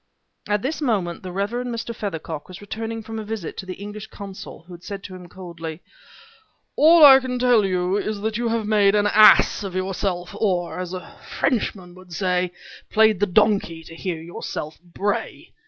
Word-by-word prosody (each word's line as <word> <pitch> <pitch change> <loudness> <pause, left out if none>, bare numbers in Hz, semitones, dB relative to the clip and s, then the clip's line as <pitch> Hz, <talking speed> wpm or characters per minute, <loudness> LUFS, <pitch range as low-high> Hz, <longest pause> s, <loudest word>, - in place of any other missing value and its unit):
At 210 -1 0
this 305 +4 -2
moment 200 - -1
the 185 - -7
Rev. 200 +3 -2
Mr. 240 -1 -4
Feathercock 160 -7 -5
was 185 0 -10
returning 225 +2 -5
from 225 0 -6
a - - -5
visit 210 -5 -5
to 190 - -7
the 185 - -5
English 210 +2 -8
consul 195 -5 -10
who 180 +1 -13
had 175 +1 -12
said 200 -1 -7
to 190 - -9
him 180 -1 -11
coldly: 170 -3 -8 0.9
"All 325 +2 +6
that - - +12
I 265 - +8
can 255 -1 -3
tell 245 -3 +4
you 185 0 0
is 210 0 -3
that 220 0 -2
you 235 +1 -1
have 225 -1 -1
made 205 -1 +3
an 205 0 +3
ass 215 0 +6
of 190 -2 -6
yourself 185 -1 -2
or, 180 -5 -1
as 180 -1 -4
a 180 - -10 0.2
Frenchman 195 -8 -1
would 185 -1 -14
say, 180 -1 0 0.4
played 220 -3 +4
the 205 - +2
donkey 195 -4 +2
to 165 - -12
hear 170 -1 -4
yourself 160 -2 -6
bray. 185 +4 -4
200 Hz, 190 wpm, -22 LUFS, 180-220 Hz, 0.9 s, that